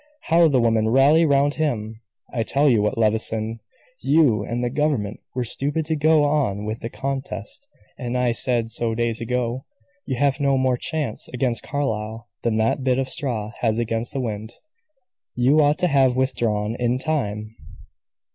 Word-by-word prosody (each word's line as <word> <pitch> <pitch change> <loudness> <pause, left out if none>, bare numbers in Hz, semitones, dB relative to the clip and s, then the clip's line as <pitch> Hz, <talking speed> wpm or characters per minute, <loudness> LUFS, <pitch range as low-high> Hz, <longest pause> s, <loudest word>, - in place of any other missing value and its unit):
"How 165 0 +4
the 135 -4 +3
women 115 -2 +2
rally 145 +7 +5
round 140 0 +3
him! 115 -8 -2 0.3
I 120 - 0
tell 140 +6 +2
you 115 -6 +4
what, 105 +2 0
Levison, 110 0 0 0.4
you 140 -10 +3
and 120 +3 -3
the 120 - 0
government 130 -8 -1 0.2
were 125 - 0
stupid 145 +6 -2
to 160 - 0
go 155 0 +4
on 135 -9 0
with 110 +1 -4
the 115 - -5
contest, 135 - -4 0.3
and 125 0 -2
I 125 -1 +2
said 115 -1 0
so 115 -1 0
days 115 -1 -1
ago. 125 +1 -2 0.4
You 130 - -1
have 140 +2 +1
no 140 -1 +2
more 130 -1 +2
chance 145 -3 -3
against 125 -2 -1
Carlyle 115 -5 -3
than 115 -2 0
that 115 +4 +1
bit 130 -1 +2
of 135 -1 -1
straw 115 -7 -2
has 110 -2 +1
against 115 0 -2
the 135 - -2
wind. 110 -1 -5 0.8
You 135 +6 +4
ought 145 +1 +3
to 180 - +2
have 135 -5 +3
withdrawn 115 -5 0
in 120 0 +1
time." 110 -7 -3
125 Hz, 170 wpm, -22 LUFS, 115-140 Hz, 0.8 s, rally